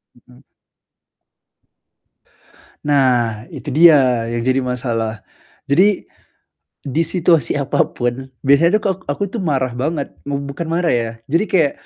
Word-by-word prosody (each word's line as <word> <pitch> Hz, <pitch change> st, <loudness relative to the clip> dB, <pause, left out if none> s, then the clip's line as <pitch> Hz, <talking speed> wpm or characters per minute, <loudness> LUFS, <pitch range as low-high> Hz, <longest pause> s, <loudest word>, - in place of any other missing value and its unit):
Mhm. 125 Hz, +2 st, -21 dB, 2.4 s
Nah, 125 Hz, -6 st, +1 dB
itu 145 Hz, -4 st, -7 dB
dia 135 Hz, -8 st, +5 dB
yang 120 Hz, 0 st, -2 dB
jadi 130 Hz, +1 st, +2 dB
masalah. 115 Hz, -3 st, -3 dB, 0.4 s
Jadi, 185 Hz, +8 st, +2 dB, 0.8 s
di 145 Hz, +4 st, 0 dB
situasi 165 Hz, -4 st, +1 dB
apapun, 130 Hz, -2 st, -1 dB, 0.2 s
biasanya, 165 Hz, +8 st, +4 dB
tuh, -, -, -19 dB
kalau 195 Hz, -3 st, 0 dB
aku, 145 Hz, +7 st, -3 dB
tuh, 225 Hz, 0 st, -4 dB
marah 130 Hz, -7 st, 0 dB
banget. 145 Hz, +2 st, -2 dB
Mub 140 Hz, 0 st, -2 dB
bukan 140 Hz, +4 st, -5 dB
marah, 170 Hz, +1 st, 0 dB
ya, 115 Hz, -2 st, 0 dB, 0.2 s
jadi 165 Hz, +7 st, +2 dB
kayak 160 Hz, -6 st, +2 dB
140 Hz, 120 wpm, -18 LUFS, 125-165 Hz, 2.4 s, dia